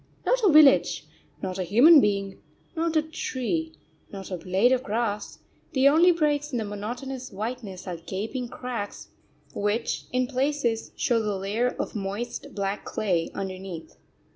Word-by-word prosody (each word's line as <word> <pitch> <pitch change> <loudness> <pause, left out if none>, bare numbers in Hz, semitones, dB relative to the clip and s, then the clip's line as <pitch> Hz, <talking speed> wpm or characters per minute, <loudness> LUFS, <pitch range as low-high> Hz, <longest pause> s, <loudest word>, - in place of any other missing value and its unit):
Not - - +2
a 405 - +6
village, 300 -2 +6 0.4
not 185 0 -3
a - - 0
human 260 - +7
being, 200 -2 -1 0.4
not 330 0 -1
a 310 - +4
tree, 315 +1 -3 0.4
not 195 -1 -8
a 180 - -2
blade 190 +8 +2
of 255 -1 +3
grass 215 -3 -2 0.4
the 265 0 +5
only 330 +5 +6
breaks 295 -3 0
in 250 - -1
the 220 - -2
monotonous 245 +6 -5
whiteness 210 -2 -5
are 175 -2 -4
gaping 220 +9 -4
cracks 240 -5 -6 0.4
which 210 +3 -1
in 255 0 +1
places 255 -3 -1
show 235 -2 +1
the 210 -2 -1
layer 215 +6 -1
of - - -3
moist, 205 +4 -5
black 200 0 -2
clay 180 -6 -1
underneath. 190 -3 -6
230 Hz, 150 wpm, -26 LUFS, 200-270 Hz, 0.4 s, human